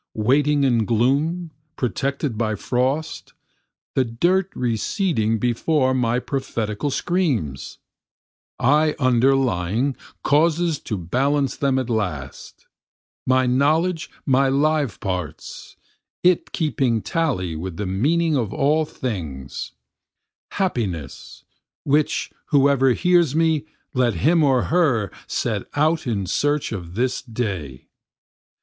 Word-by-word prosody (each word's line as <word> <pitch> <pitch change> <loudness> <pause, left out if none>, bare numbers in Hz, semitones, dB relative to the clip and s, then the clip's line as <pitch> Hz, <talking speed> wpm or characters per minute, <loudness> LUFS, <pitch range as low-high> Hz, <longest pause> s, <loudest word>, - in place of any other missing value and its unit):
Waiting 140 +6 +2
in 120 -5 +2
gloom, 145 +10 +1 0.2
protected 135 +1 -2
by 110 -1 -1
frost, 130 +8 -2 0.6
The 130 - +2
dirt 175 +11 +1
receding 115 - 0
before 130 +4 +1
my 120 -2 +1
prophetical 125 -2 -3
screams, 135 - -1 0.8
I 150 +4 +3
underlying 125 -2 +2 0.3
causes 160 +2 +2
to 105 - -1
balance 135 - 0
them 135 -2 +1
at 130 -2 -1
last, 90 - -4 0.6
My 130 0 +3
knowledge 160 +7 +1 0.2
my 135 -1 +3
live 145 -4 +1
parts, 90 -5 -5 0.5
it 180 -1 +3
keeping 135 - 0
tally 120 - -1
with 85 +1 -6
the 105 - -3
meaning 150 - +1
of 115 -7 -1
all 155 +2 +2
things, 80 - -5 0.8
Happiness, 105 - -3 0.4
(which 150 +1 +1 0.2
whoever 135 -2 +4
hears 175 -2 +3
me 160 -2 +1 0.3
let 125 -5 +1
him 160 - +3
or 130 -4 +3
her 135 - +1 0.2
set - - -2
out 155 +1 +1
in 100 -5 -1
search 145 +9 0
of 90 -5 -6
this 125 +3 0
day.) 95 - -5
130 Hz, 105 wpm, -22 LUFS, 110-150 Hz, 0.8 s, whoever